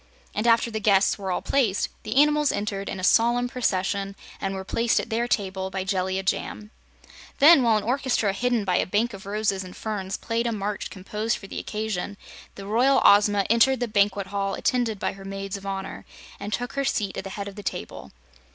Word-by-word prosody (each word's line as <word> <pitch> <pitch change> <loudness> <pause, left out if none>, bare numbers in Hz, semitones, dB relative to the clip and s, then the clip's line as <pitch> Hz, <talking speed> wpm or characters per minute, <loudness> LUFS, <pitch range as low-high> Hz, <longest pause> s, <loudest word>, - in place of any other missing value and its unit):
And, 215 +3 -1
after 230 0 +4
the 220 - -2
guests 200 -1 +3
were 195 -1 -4
all - - -2
placed, 235 -8 +1
the 215 - -5
animals 295 +1 +4
entered 200 -1 -3
in - - -5
a - - -6
solemn 240 +5 +3
procession 200 -5 -1 0.3
and 195 0 -2
were 190 - -5
placed 230 +3 +1
at 230 - -5
their 235 +2 0
table 190 -4 -1
by 190 0 -3
Jellia 190 0 -1
Jamb. 210 +2 -3 0.7
Then, 295 0 +8
while 230 -3 +4
an 210 - -2
orchestra 245 -5 0
hidden 235 +1 0
by 180 -2 +2
a - - +1
bank 215 +5 0
of 195 0 -10
roses 200 -2 -1
and 180 -1 -11
ferns 200 -3 -4
played 230 +1 -1
a - - 0
march 205 -1 -3
composed 210 +4 -3
for 195 - -12
the - - -6
occasion, 210 -2 -4 0.4
the 195 - -9
Royal 250 +6 +3
Ozma 205 -1 +5
entered 235 +4 +4
the 245 - -1
Banquet 200 -2 +1
Hall, 195 0 -2
attended 240 -4 0
by - - -2
her 195 0 -12
Maids 195 0 -5
of 195 0 -8
Honor, 195 -1 -5 0.4
and 205 +1 -5
took 245 +4 -3
her 275 - -1
seat 205 -7 -1
at - - -4
the 195 - -6
head 200 0 -4
of 200 - -7
the 205 - -9
table. - - -6
205 Hz, 210 wpm, -25 LUFS, 195-230 Hz, 0.7 s, Then